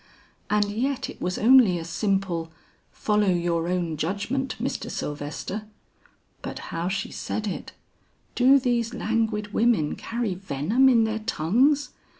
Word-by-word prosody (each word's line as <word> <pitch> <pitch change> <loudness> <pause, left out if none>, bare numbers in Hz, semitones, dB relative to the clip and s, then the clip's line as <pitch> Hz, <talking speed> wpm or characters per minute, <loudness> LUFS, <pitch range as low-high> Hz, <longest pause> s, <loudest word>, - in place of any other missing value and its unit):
And 210 -1 +2
yet 265 +5 -2
it - - -16
was 180 0 -1
only 230 -5 +6
a 165 - -5
simple, 180 -3 -1 0.4
'Follow 210 -1 +1
your 170 -2 0
own 175 -3 -1
judgment, 205 - -2
Mr. - - -3
Sylvester.' 150 +8 -5 0.7
But - - -6 0.2
how 170 +1 -2
she 190 +1 -2
said 215 - -4
it! 205 - -5 0.6
Do 260 +3 +6
these 245 -3 0
languid 215 -2 -1
women 220 -10 +2
carry 230 -4 -3
venom 190 - +2
in 235 -3 +5
their 220 0 -1
tongues? 240 - +2
210 Hz, 135 wpm, -25 LUFS, 175-235 Hz, 0.7 s, only